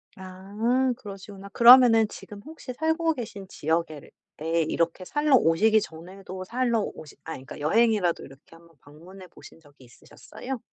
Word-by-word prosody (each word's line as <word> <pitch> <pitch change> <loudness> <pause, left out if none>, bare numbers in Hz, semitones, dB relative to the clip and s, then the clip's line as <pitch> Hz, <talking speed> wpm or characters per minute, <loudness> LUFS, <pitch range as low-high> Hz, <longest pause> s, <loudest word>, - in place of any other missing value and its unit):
아 205 +8 -2
그러시구나. 200 -2 -11
그러면은 235 0 +7
지금 205 0 -11
혹시 315 -4 -9
살고 320 +3 0
계신 205 -5 -8
지역에를 160 -3 -3 0.3
예 165 +1 0
이렇게 170 +3 -2
살러 295 +5 +2
오시기 215 +2 +3
전에도 185 +2 -9
살러 235 +3 -1
오시 155 -6 -8
아니 150 -5 -8
그러니까 - - -10
여행이라도 205 +2 +1
이렇게 135 +4 -16
한번 165 0 -21
방문해 180 +6 -14
보신 165 - -16
적이 145 -4 -20
있으셨어요? 245 - -10
195 Hz, 370 characters per minute, -25 LUFS, 165-235 Hz, 0.3 s, 그러면은